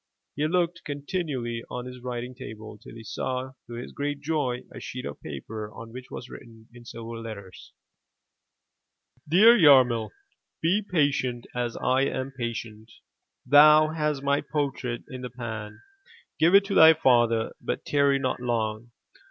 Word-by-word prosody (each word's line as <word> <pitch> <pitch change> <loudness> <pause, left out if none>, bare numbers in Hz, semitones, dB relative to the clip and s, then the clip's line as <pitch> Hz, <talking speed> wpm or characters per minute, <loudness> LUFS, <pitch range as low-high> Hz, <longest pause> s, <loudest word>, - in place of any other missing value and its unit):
He 150 +2 0
looked 175 0 0
continually 140 -6 -4
on 125 0 -5
his 125 0 -9
writing 125 0 -5
table 110 -4 -9
till - - -13
he 115 - -10
saw 130 +4 -4 0.2
to 120 - -9
his 120 +1 -7
great 145 0 -3
joy 145 -5 -1
a - - -8
sheet 125 - -7
of 70 - -7
paper 105 +9 -7
on 115 +1 -11
which 130 0 -9
was 120 - -8
written 115 -3 -13
in 120 -1 -14
silver 115 -1 -8
letters 100 -5 -10 0.8
— - - -32
''Dear 220 +7 +8
Yarmil, 125 -7 +6 0.3
— - - -56
Be 185 +6 +3
patient, 145 - 0
as 120 -1 -3
I 130 +1 +1
am 130 0 -3
patient. 115 -3 -6 0.5
Thou 150 +1 +7
hast 150 -3 -2
my 140 +1 +2
portrait 135 -5 -3
in 130 -3 -8
the 125 - -5
pan; 110 -3 -7 0.6
give 170 +4 +5
it 200 0 +6
to 200 - -3
thy 160 -3 +8
father, 120 -6 +3
but - - -4
tarry 140 -1 +3
not 130 -2 -2
long. 115 -2 -2
125 Hz, 160 wpm, -26 LUFS, 115-145 Hz, 0.8 s, Dear